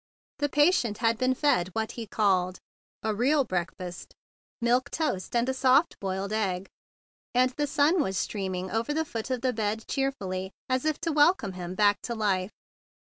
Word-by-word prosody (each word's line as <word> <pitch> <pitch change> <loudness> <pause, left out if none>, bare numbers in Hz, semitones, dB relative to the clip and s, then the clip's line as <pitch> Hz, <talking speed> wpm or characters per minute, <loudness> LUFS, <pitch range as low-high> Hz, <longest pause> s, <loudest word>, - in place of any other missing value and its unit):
The 290 0 +1
patient 290 - +3
had 230 -1 +1
been 255 0 +2
fed 250 - +2
what 220 0 -2
he 230 -2 -7
called 185 -4 +1 0.5
"a 220 - 0
real 275 +7 +3
breakfast," 180 -3 -5 0.4
milk 245 +3 +2
toast 285 - -2
and 235 +1 +2
a 265 - +1
soft 265 +4 +3
boiled 195 +1 -3
egg, 195 -3 -1 0.7
and 255 +1 +4
the 295 +3 -2
sun 310 +4 +3
was 190 -8 -1
streaming 190 -2 -3
over 230 +7 -1
the 320 0 0
foot 230 -4 -5
of 255 -2 -1
the 255 -1 +1
bed 220 0 -2
gayly 195 -9 -2
as 255 +2 0
if 310 -1 0
to 330 - 0
welcome 295 - +3
him 180 0 -6
back 205 0 +3
to 235 - -4
life. 195 -4 0
225 Hz, 175 wpm, -28 LUFS, 195-275 Hz, 0.7 s, and